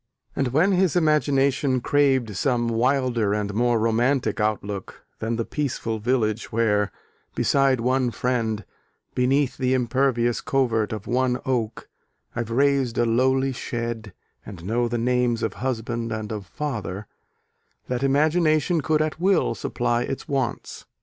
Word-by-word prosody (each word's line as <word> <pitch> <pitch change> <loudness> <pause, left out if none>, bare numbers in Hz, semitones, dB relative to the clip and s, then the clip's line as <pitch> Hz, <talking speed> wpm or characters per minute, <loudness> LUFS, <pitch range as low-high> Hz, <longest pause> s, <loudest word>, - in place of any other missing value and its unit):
And 135 - 0
when 155 +10 +3
his 185 -3 +2
imagination 140 -4 +2
craved 130 -5 +2
some 120 +2 +1
wilder 120 -3 +1
and 105 -1 -2
more 120 +2 +2
romantic 120 +5 +1
outlook 105 -2 -3
than 115 +1 -1
the 115 0 -2
peaceful 120 -6 -3
village 110 -2 0
where, 105 -3 +1 0.4
beside 135 -2 +2
one 130 +1 +1
friend, 115 -4 -1 0.5
Beneath 130 +2 +1
the 130 0 +1
impervious 120 -1 +1
covert 115 -6 0
of 110 -2 -5
one 125 0 +1
oak, 120 -4 -2 0.5
I've 120 -2 -3
raised 135 -1 +2
a - - +3
lowly 130 +3 +2
shed, 115 -3 -4 0.3
and 95 -5 -10
know 120 +4 +1
the 120 0 -2
names 120 -1 +1
Of 110 - -1
Husband 120 -2 -2
and 110 -1 -4
of 105 -3 -5
Father, 105 - -4 0.8
that 125 0 -2
imagination 155 +3 +2
could 155 +1 +2
at 155 0 -4
will 190 0 +2
supply 120 -1 -1
its 130 +2 -4
wants. 130 -4 -3
125 Hz, 135 wpm, -24 LUFS, 115-135 Hz, 0.8 s, when